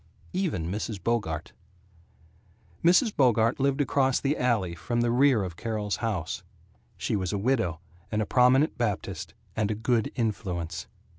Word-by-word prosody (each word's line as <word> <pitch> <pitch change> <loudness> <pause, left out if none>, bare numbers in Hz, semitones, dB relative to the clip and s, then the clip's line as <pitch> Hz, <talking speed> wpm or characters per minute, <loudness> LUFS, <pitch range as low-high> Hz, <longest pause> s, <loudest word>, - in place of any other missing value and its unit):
Even 175 - -1
Mrs. 105 +1 -3
Bogart. 105 -10 -1 1.3
Mrs. 195 +7 +4
Bogart 115 -3 +3
lived 140 +1 +2
across 135 -1 +2
the 145 +2 0
alley 115 - +1
from 85 +9 -2
the 120 0 +2
rear 125 -3 +4
of 90 -3 -5
Carol's 105 -1 -2
house. 100 -9 -2 0.6
She - - -1
was 95 -3 -1
a 100 - -1
widow, 105 -7 0 0.3
and 105 - 0
a 110 - +1
Prominent 130 +6 +4
Baptist, 105 -5 -2 0.2
and 105 -2 0
a 110 - 0
Good 115 0 0
Influence. 95 -8 -2
115 Hz, 145 wpm, -27 LUFS, 100-130 Hz, 1.3 s, Mrs